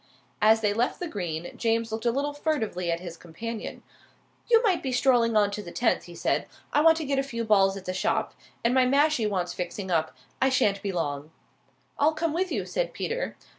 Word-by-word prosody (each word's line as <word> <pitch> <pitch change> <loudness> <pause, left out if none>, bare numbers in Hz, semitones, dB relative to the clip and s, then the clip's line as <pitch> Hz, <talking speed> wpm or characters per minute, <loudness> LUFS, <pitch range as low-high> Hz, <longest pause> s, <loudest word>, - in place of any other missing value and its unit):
As 220 +1 +5
they 210 -2 +2
left 235 +4 0
the 355 - -3
green 175 - -5
James 230 -1 0
looked 225 +2 -2
a - - +4
little 285 +4 -1
furtively 225 - -1
at 170 +1 -2
his 170 -2 -8
companion. 215 +8 -7 0.7
"You 460 0 +5
might 385 -6 +2
be 265 - -3
strolling 245 -3 +3
on 205 -1 +3
to 210 - -4
the 175 -4 -9
tenth," 235 +5 +1
he 175 - -11
said. - - 0 0.3
"I 295 - +4
want 325 +1 +6
to 320 - -3
get 275 0 0
a - - +3
few 235 -4 -4
balls 195 -3 +3
at 190 - -10
the 185 - -2
shop. 185 - 0 0.3
And 235 +1 +2
my 260 0 +5
mashie 280 -3 +3
wants 180 -3 -2
fixing 185 +2 -5
up. 160 -2 0 0.2
I 265 - +4
sha'n't 205 -6 +2
be 200 - -2
long." 145 -4 -3 0.7
"I'll 305 +2 +4
come 315 0 -1
with 365 +2 -1
you," - - -1
said - - -2
Peter. - - -3
225 Hz, 215 wpm, -27 LUFS, 185-280 Hz, 0.7 s, want